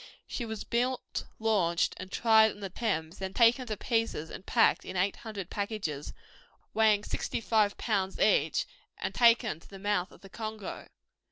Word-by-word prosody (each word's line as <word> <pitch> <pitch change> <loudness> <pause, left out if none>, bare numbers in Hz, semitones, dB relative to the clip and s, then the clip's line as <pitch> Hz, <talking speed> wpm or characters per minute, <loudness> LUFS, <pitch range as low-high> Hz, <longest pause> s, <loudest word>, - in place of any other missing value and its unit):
She 240 - -4
was 220 -2 -5
built, 250 +2 -2
launched, 195 -7 +1
and 185 +1 -8
tried 220 -1 +5
on - - -15
the 195 -3 -6
Thames; 175 -7 -2
then 190 0 -5
taken 245 +2 +4
to 215 -2 -3
pieces 225 -10 -1
and - - -8
packed 225 +3 +3
in 185 - -6
800 195 0 -2
packages, 200 -9 -3 0.6
weighing 215 -2 +4
65 215 -2 0
lbs. 195 -4 -1
each, - - +3 0.3
and - - -3
taken 230 -6 +4
to - - -18
the 195 - -10
mouth 195 -2 -1
of - - -17
the 195 - -13
Congo. 215 -1 -6
210 Hz, 160 wpm, -30 LUFS, 190-225 Hz, 0.6 s, tried